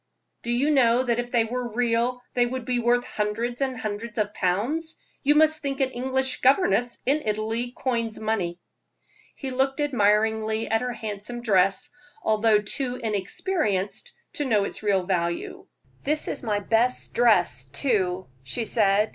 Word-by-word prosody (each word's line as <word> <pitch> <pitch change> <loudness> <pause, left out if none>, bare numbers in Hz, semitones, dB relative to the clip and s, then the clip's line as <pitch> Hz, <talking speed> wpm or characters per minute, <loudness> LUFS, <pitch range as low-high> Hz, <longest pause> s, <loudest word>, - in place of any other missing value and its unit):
"Do 235 - -6
you 255 +6 +2
know 250 -3 +4
that 240 -2 0
if 240 0 -3
they 235 -2 +4
were 240 -1 -4
real 245 +1 +1
they 245 -1 +3
would 255 -1 -4
be 245 -1 0
worth 240 +1 +2
hundreds 230 +4 -2
and 260 -2 0
hundreds 215 +2 -5
of 210 -1 0
pounds? 245 - -1 0.2
You 290 +1 +3
must 310 0 +4
think 275 -2 -3
an 265 -1 +1
English 260 +1 -1
governess 260 -3 +3
in 285 +4 +2
Italy 220 +3 -2
coins 230 -4 -1
money." 195 -6 -2 0.8
He 270 -2 -5
looked 270 +2 0
admiringly 220 -4 +2
at 225 0 +1
her 250 -1 -2
handsome 220 +1 -6
dress, 195 -3 +2 0.3
although 215 -1 +3
too 250 +3 -2
inexperienced 215 - -2 0.2
to 295 - -2
know 215 -6 +3
its - - -4
real 200 -3 +2
value. 170 -2 -2 0.4
"This 300 +2 -1
is - - -4
my 215 -4 0
best 230 +4 0
dress, 175 - +3
too," 185 - 0 0.2
she 225 - -4
said. 210 -1 +2
235 Hz, 155 wpm, -25 LUFS, 210-255 Hz, 0.8 s, know